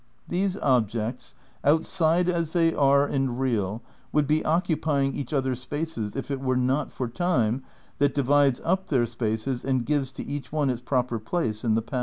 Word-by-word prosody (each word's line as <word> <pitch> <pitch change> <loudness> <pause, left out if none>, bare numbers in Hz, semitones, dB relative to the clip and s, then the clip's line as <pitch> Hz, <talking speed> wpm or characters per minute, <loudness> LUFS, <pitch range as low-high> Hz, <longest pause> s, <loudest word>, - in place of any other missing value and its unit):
These 190 +2 0
objects, 120 - 0 0.3
outside 165 +3 +3
as 170 -3 0
they 165 -2 +3
are 140 0 +4
and 135 -3 -1
real, 115 -4 -1 0.3
would 150 -1 +2
be 155 +2 +1
occupying 155 -4 +1
each 140 - -5
other's 130 -3 0
spaces 145 -7 -4
if 135 +1 -4
it 135 - -2
were 130 -1 +1
not 130 +3 0
for 125 - -3
time 125 -4 0 0.4
that 140 -1 +2
divides 140 -1 +3
up 190 +2 0
their 125 -5 +3
spaces 115 +2 -2
and 130 -3 0
gives 140 -2 0
to - - -6
each 145 -1 -5
one 145 -3 +1
its 120 -1 -4
proper 125 -2 0
"place" 110 -3 -2
in 110 -2 +2
the 115 - 0
past. 125 +3 -3
135 Hz, 180 wpm, -26 LUFS, 120-155 Hz, 0.4 s, are